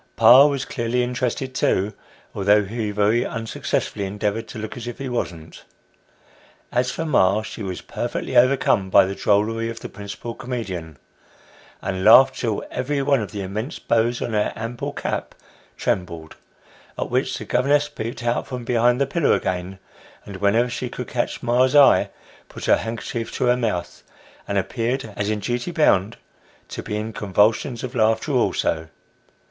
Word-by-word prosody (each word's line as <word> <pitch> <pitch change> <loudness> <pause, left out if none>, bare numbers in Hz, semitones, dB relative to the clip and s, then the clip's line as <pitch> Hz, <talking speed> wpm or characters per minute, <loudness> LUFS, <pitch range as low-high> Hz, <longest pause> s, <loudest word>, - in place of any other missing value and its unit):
Pa 135 +4 +8
was 140 -2 -2
clearly 125 -1 -1
interested 125 +1 -2
too, 105 -4 +1 0.4
although 100 +1 +3
he 110 +1 -3
very 105 +3 +2
unsuccessfully 115 -2 -3
endeavoured 105 +3 -2
to - - -9
look 110 0 -6
as 120 -1 -7
if 120 - -6
he 135 - -5
wasn't. 85 -10 -5 1.1
As 125 +1 +1
for 165 - -3
ma, 105 -8 +3
she 110 - -8
was 95 -3 -4
perfectly - - -4
overcome 120 -6 +3
by 95 +1 +6
the 95 - -3
drollery 110 +3 +1
of 115 - -7
the - - -7
principal 105 +3 -7
comedian, 95 - -5 0.9
and 95 -1 -3
laughed 130 +5 +7
till 110 -4 -1
every 140 +2 -1
one 140 -3 +2
of 105 - -5
the 100 -1 -4
immense 105 +8 -4
bows 115 +1 0
on 115 - -4
her 105 -1 +1
ample 115 +2 -4
cap - - -4 0.4
trembled, 85 -3 -3 0.6
at - - -3
which - - 0
the - - -7
governess 145 +4 +2
peeped 120 -4 -6
out 120 0 -1
from 125 -2 -6
behind 120 +1 +2
the 140 - +3
pillar 150 +3 +1
again, 95 +1 -2 0.5
and 100 -2 -8
whenever 105 +5 +2
she 125 +1 -4
could 125 - -7
catch 120 -1 -2
ma's 125 +3 +2
eye, 145 -2 +6 0.4
put - - -8
her - - +5
handkerchief 115 0 -4
to - - -2
her 125 0 +4
mouth, 105 -8 -3 0.5
and 100 - -1
appeared, 115 +3 -2
as 105 0 -2
in 110 - 0
duty 120 - -2
bound, 115 - +2 0.5
to - - -6
be 105 - -5
in 110 +1 -4
convulsions 105 +5 +1
of 130 -1 -5
laughter 110 -2 +1
also. 80 -1 0
115 Hz, 165 wpm, -22 LUFS, 100-125 Hz, 1.1 s, Pa